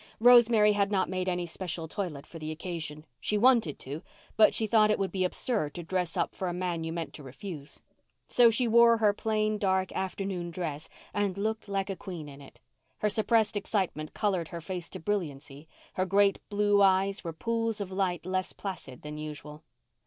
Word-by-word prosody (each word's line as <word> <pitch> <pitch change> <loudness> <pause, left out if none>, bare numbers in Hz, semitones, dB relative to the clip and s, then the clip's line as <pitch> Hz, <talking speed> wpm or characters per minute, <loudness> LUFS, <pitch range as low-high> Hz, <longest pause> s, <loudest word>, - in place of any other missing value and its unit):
Rosemary 235 -3 +7
had 205 0 +1
not 190 -2 +1
made 185 0 -1
any 180 -1 -1
special 165 -1 -4
toilet 160 -6 -4
for 165 - -10
the 155 0 -5
occasion; 155 -2 -5
she 210 - 0
wanted 230 - +4
to, 145 +4 -7 0.3
but 215 -1 +5
she 220 - +1
thought 215 -1 +4
it 215 - +3
would 195 -1 -1
be 190 -1 0
absurd 180 - -1
to 175 - -5
dress 180 0 -2
up - - 0
for 185 - -3
a 175 - -2
man 175 -2 -2
you 160 - -3
meant 165 -1 -4
to - - -10
refuse. 140 +3 -8 0.5
So 240 -1 +6
she 235 +2 +1
wore 235 0 +6
her 210 -2 +3
plain 215 0 0
dark 190 -2 +1
afternoon 190 -1 -3
dress 160 -3 -5 0.2
and 200 -2 0
looked 220 +1 -2
like 195 0 -1
a - - -3
queen 175 -6 -7
in 140 0 -11
it. 140 - -15 0.4
Her 210 - +1
suppressed 220 0 +2
excitement 190 -7 -2
coloured 190 -6 0
her 170 - -6
face 175 0 -6
to - - -7
brilliancy, 150 -6 -4 0.3
her 185 - 0
great 200 +1 +3
blue 205 -1 +3
eyes 195 +1 +3
were 170 - -3
pools 230 +5 -1
of 195 -2 -4
light 185 -3 -1
less 185 0 -2
placid 180 -10 -7
than 150 0 -6
usual. 150 0 -7
190 Hz, 195 wpm, -29 LUFS, 165-210 Hz, 0.5 s, Rosemary